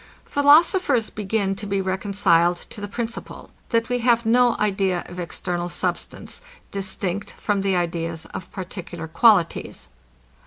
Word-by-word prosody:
Philosophers 285 - +4
begin 205 -1 -1
to 205 +1 -6
be 195 0 0
reconciled 190 -3 +2
to 205 - -8
the 205 - -4
principle, 235 +3 -6 0.2
that 230 -1 +1
we 245 0 0
have 235 -1 +3
no 240 +1 +4
idea 195 -3 0
of 180 +1 -9
external 175 0 -3
substance, - - -4 0.3
distinct 195 0 -3
from 205 -2 -1
the 195 -1 +1
ideas 165 -2 -2
of 185 - -7
particular 175 -3 -7
qualities. 180 0 +2
195 Hz, 130 wpm, -23 LUFS, 175-225 Hz, 0.3 s, Philosophers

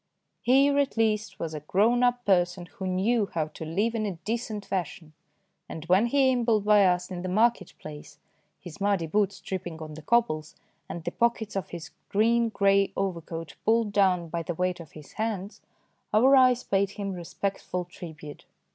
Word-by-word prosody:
Here 275 +3 +4
at 280 -4 0
least 215 -2 0
was 160 -1 -4
a 155 - -4
grown 210 +11 +2
up 245 0 +1
person 175 -2 +2
who 190 +2 -7
knew 200 +4 +1
how 155 -2 0
to 155 - -9
live 200 +9 0
in 215 -2 -1
a 195 - -4
decent 220 -2 -3
fashion, 170 -4 -4 0.6
and 160 -1 -7
when 190 +7 +4
he 265 +1 +3
ambled 230 -4 +1
by 210 -2 +6
us 180 +1 0
in 180 -1 -4
the 185 - -4
market 215 -1 +1
place, 150 -1 -10 0.4
his 180 +2 -11
muddy 200 -4 +1
boots 200 +3 0
tripping 175 -4 -5
on 155 -1 -8
the 155 - -9
cobbles, 155 -6 0 0.3
and 170 - -6
the - - -3
pockets 230 -3 0
of 195 -5 -3
his 170 -1 -8 0.2
green 230 +3 +3
grey 200 -1 +3
overcoat 165 -4 -4
pulled 225 -1 +2
down 185 -4 +2
by 170 +1 -2
the 170 +1 -4
weight 180 +1 -1
of 165 -4 -12
his 150 -2 -12
hands, 210 -2 -3 0.5
our 260 +6 +6
eyes 255 -2 +5
paid 195 0 +1
him 200 -1 -5
respectful 180 +1 -4
tribute. 160 -4 -10
195 Hz, 180 wpm, -27 LUFS, 175-225 Hz, 0.6 s, by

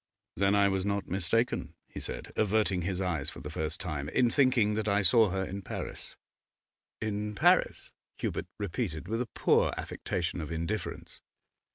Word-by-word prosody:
'Then 100 +1 +3
I 100 -1 +5
was 95 -1 0
not 100 0 -1
mistaken,' 100 +6 0
he - - -8
said, - - -7
averting 105 -3 +2
his 90 +1 -2
eyes 85 -7 -1
for - - -9
the - - -7
first 80 0 -3
time, 75 -5 -3
'in 120 +7 +3
thinking 125 -6 +4
that 110 0 -1
I 100 0 +3
saw 110 +3 +6
her 95 +1 -1
in 100 +2 -5
Paris.' - - -6 0.8
'In 105 -1 -2
Paris?' - - +3 0.2
Hubert - - -2
repeated, 95 -4 -3
with 115 +2 -1
a 125 - -2
poor - - +4
affectation 85 0 -3
of 75 - -6
indifference. 85 +4 -4
100 Hz, 165 wpm, -30 LUFS, 90-110 Hz, 0.8 s, saw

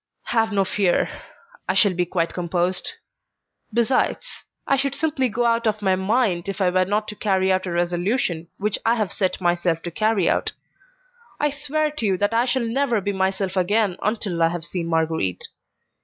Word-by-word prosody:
"Have 225 -1 +2
no 195 -1 +2
fear; 190 -2 +1 0.6
I - - +2
shall 200 -4 +5
be 175 0 0
quite 170 -2 -1
composed. 180 - -1 0.8
Besides, 235 +3 0 0.2
I 275 - +3
should 275 0 -1
simply 295 -4 0
go 240 +3 0
out 230 0 +2
of 215 -1 -1
my 190 -1 +3
mind 190 -2 0
if 195 0 -4
I 185 -2 +2
were 185 0 +2
not 210 +2 -1
to 210 - -6
carry 190 -2 +1
out 185 0 0
a - - -3
resolution 175 +1 0
which 210 0 -1
I 230 +1 +3
have 215 -5 -1
set 190 -3 0
myself 175 -2 0
to 175 - -4
carry 215 -1 +1
out. - - +1 0.9
I 295 0 +1
swear 300 +2 -1
to 295 -7 -3
you 190 -2 +1
that 205 +3 0
I 235 +2 +3
shall 255 -1 0
never 240 -1 +1
be 200 +1 -2
myself 190 0 -1
again 195 +1 +2
until 205 -5 -1
I 165 - +6
have 170 0 -4
seen 170 -1 -4
Marguerite. 160 - -1
195 Hz, 185 wpm, -23 LUFS, 180-230 Hz, 0.9 s, I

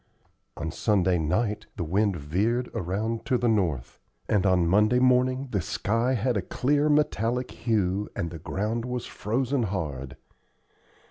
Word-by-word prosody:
On 80 +1 -3
Sunday 95 -2 +2
night 105 +7 -1
the 90 - -3
wind 100 +4 +1
veered 100 - -1
around 110 +3 -2
to 125 - +2
the 120 - 0
north, 85 - 0 0.3
and 100 -2 +2
on 90 -2 +3
Monday 105 +7 +4
morning 130 +1 +3
the 100 - 0
sky 115 +9 0
had 120 +2 0
a 100 - +1
clear 145 +10 +1
metallic 125 -4 +1
hue 105 -3 0
and 85 -2 -3
the 85 - -7
ground 105 +7 -2
was 125 0 -3
frozen 125 +5 -1
hard. 75 - -3
105 Hz, 145 wpm, -26 LUFS, 90-125 Hz, 0.3 s, Monday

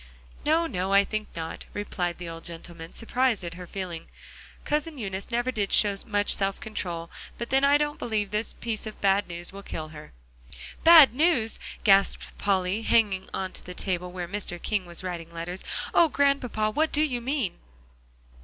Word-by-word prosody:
"No, 320 +3 +3
no, 190 - -2
I 200 0 +7
think 215 +1 -3
not," 165 -1 -6
replied 180 -4 -2
the 175 - -7
old 165 0 -8
gentleman, 165 0 -8
surprised 240 -2 +1
at 170 0 -5
her 180 0 -9
feeling. 180 -4 -6 0.6
"Cousin 300 +1 -1
Eunice 195 -4 -5
never 240 +1 0
did 205 -5 -2
show 205 -2 +5
much 205 -2 +2
self 195 0 0
control; 170 -6 -5 0.3
but 235 - -5
then, 270 +1 +3
I 285 +1 +6
don't 295 0 -2
believe 210 -3 -1
this 210 +1 +2
piece 225 -2 -4
of 215 - -8
bad 200 +1 +2
news 175 +1 -5
will 200 - -8
kill 155 -5 -6
her." 150 -1 -11 0.7
"Bad 320 -6 +9
news?" 260 -6 +2 0.2
gasped 195 -1 +4
Polly, 195 +1 +1
hanging 205 -4 +2
to 190 -1 -4
the 180 - -9
table 180 -2 -1
where 180 -1 -5
Mr. 190 -2 -4
King 200 -2 -1
was 175 +1 -5
writing 170 -2 -5
letters. 170 +2 -5 0.3
"Oh, 335 - +6
Grandpapa! 255 -7 +1
what 310 +7 +1
do 300 - +2
you 250 -6 -1
mean?" 255 - -2
200 Hz, 175 wpm, -27 LUFS, 180-240 Hz, 0.7 s, Bad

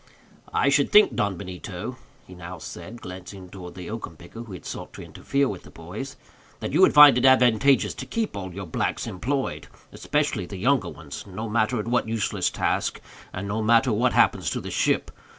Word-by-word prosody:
"I 140 - +2
should 140 0 +2
think, 210 0 +7
Don 100 -3 0
Benito," 90 -1 -6 0.3
he 95 - -13
now 90 0 -8
said, 115 +7 -9
glancing 90 +1 -9
towards 90 -3 -9
the 90 -2 -8
oakum 110 -8 -6
picker 90 +8 -10
who 115 -4 -9
had 90 - -10
sought - - -7
to - - -9
interfere 140 +1 -1
with 100 -6 -5
the - - -15
boys, - - -8 0.4
"that - - -4
you - - +4
would - - +6
find 145 -4 +9
it 125 - +1
advantageous 130 +1 +4
to 130 - -8
keep 225 +7 -2
all 95 -2 -5
your 95 +2 -6
blacks 80 - -2
employed, 130 +8 -3 0.2
especially 90 - -1
the 100 - -7
younger 130 +7 +2
ones, 75 -4 -9
no 105 +4 -5
matter 110 +2 +1
at 105 - -4
what 120 -1 +1
useless 110 -2 0
task, - - -1 0.3
and 100 +2 -5
no 105 +3 -2
matter 115 +2 +4
what 120 +4 +2
happens - - +3
to - - -2
the - - -7
ship. - - +1
110 Hz, 200 wpm, -25 LUFS, 95-125 Hz, 0.4 s, find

